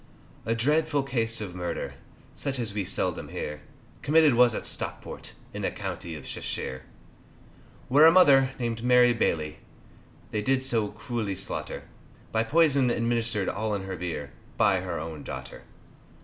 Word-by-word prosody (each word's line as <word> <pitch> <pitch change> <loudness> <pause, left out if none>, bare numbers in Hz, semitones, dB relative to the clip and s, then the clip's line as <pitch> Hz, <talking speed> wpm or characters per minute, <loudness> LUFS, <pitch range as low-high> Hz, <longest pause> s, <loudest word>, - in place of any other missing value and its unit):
A 115 - +2
dreadful 145 +4 +1
case 115 -4 -1
of 100 -4 -5
murder, 90 -1 -4 0.4
Such 135 -1 -3
as 115 -5 -1
we 100 -2 -2
seldom 90 -2 -1
hear, 75 0 -5 0.4
Committed 155 -1 +5
was 120 -1 +5
at - - -4
Stockport, - - -4 0.2
In - - -5
the - - 0
County 85 -2 -5
of 75 - -9
Cheshire. 65 0 -4 1.1
Where 145 +5 +7
a - - +8
mother, 140 -7 +6
named 115 -2 -3
Mary 125 0 +6
Bailey, 80 -9 -1 0.7
They 105 - -1
did 130 +4 +1
so 115 -5 +1
cruelly 105 -1 -4
slaughter, 100 - -3 0.5
By 110 0 +2
poison 140 -1 +3
administered 115 -3 0
all 110 -1 -1
in 100 - -4
her 95 -1 -5
beer 80 -5 -5 0.3
By - - +4
her - - -4
own 80 -1 -6
daughter. 65 0 -8
115 Hz, 150 wpm, -27 LUFS, 95-130 Hz, 1.1 s, a